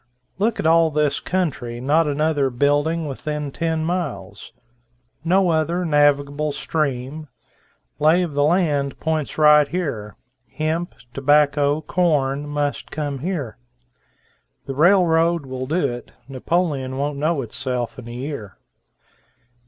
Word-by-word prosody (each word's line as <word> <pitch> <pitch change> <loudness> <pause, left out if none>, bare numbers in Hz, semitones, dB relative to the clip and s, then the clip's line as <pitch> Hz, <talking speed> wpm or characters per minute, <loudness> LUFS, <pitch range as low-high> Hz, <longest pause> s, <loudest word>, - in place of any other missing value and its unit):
Look 225 +3 +1
at - - -2
all 165 0 +5
this 150 -1 0
country, 140 -10 -2
not 150 +5 +2
another 145 -1 +1
building 145 +6 +1
within 150 +1 -4
ten 160 +1 -1
miles, 150 - -4 0.7
no 185 +2 +3
other 165 +3 0
navigable 145 -1 +2
stream, 145 0 -3 0.7
lay 160 +4 +4
of 165 -4 -4
the 145 0 +2
land 150 -4 +1
points 160 -2 -2
right 150 -1 +6
here; 135 - -4 0.4
hemp, 160 +3 -2 0.2
tobacco, 145 +1 +3
corn, 145 -4 0
must 145 -1 -2
come 145 -3 -4
here. 150 - -4 1.1
The 135 - -4
railroad 170 0 +3
will 130 0 -5
do 145 -4 0
it, 120 - -9 0.2
Napoleon 135 -1 -1
won't 140 0 -2
know 155 -1 0
itself 125 +1 -4
in 120 - -10
a - - -7
year." 125 -5 -6
150 Hz, 120 wpm, -21 LUFS, 135-160 Hz, 1.1 s, right